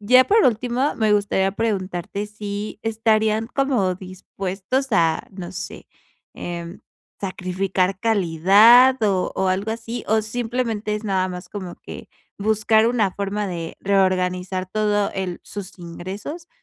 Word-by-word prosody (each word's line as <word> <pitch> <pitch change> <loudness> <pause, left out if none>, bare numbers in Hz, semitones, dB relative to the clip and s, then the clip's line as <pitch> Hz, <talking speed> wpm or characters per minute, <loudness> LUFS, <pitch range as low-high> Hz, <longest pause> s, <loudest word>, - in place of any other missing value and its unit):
Ya 255 +5 +6
por 435 +1 +4
último, 245 +4 +1
me 215 -2 +2
gustaría 195 -2 +1
preguntarte 200 -2 -2
si 210 0 -6
¿estarían 220 0 +1
como 250 -10 +1
dispuestos 190 +6 -4
a, 165 -5 +2
no 185 -1 -7
sé, 180 0 -7 0.5
em, 170 +1 -6 0.4
sacrificar 185 0 -1
calidad 220 +6 +6
o 190 -3 +1
o 190 - 0
algo 195 +4 0
así, 230 +1 -5
o 220 0 +3
simplemente 225 -1 -2
es 210 +1 -5
nada 190 -2 0
más 180 0 -7
como 185 -4 -7
que, - - -10 0.3
buscar 220 +1 +3
una 220 -6 +1
forma 200 +1 -2
de 170 -3 -5
reorganizar 185 -1 +1
todo 210 -1 +1
el 185 -2 -3
sus 200 -1 -8
ingresos? 195 - -7
205 Hz, 130 wpm, -22 LUFS, 185-220 Hz, 0.5 s, Ya